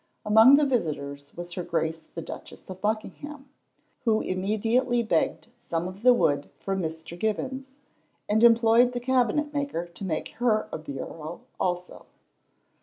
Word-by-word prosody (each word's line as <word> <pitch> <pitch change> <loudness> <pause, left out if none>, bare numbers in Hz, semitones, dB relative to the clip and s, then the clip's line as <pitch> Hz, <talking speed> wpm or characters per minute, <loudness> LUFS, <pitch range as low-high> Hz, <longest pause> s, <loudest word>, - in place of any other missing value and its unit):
Among 220 +6 +8
the 295 +1 +4
visitors 145 - -2
was 175 0 -6
her 180 - -3
Grace 165 -1 -2
the 165 - -4
Duchess - - -10
of 185 0 -9
Buckingham, 270 +6 -4 0.5
who 220 -3 +2
immediately 225 +6 +1
begged 170 -8 0
some 165 +1 -3
of 185 +2 -9
the 250 +1 +7
wood 145 -12 +2
from 195 -1 -2
Mr. 160 0 -5
Gibbons, 260 +7 -3 0.5
and 215 +2 +2
employed 235 +1 +6
the 245 - -2
cabinet 260 +4 +1
maker 280 - -2
to 175 +3 -11
make 170 -5 -2
her 230 -3 +2
a - - -4
bureau 155 +2 -7 0.2
also. 180 0 -3
210 Hz, 145 wpm, -26 LUFS, 170-245 Hz, 0.5 s, Among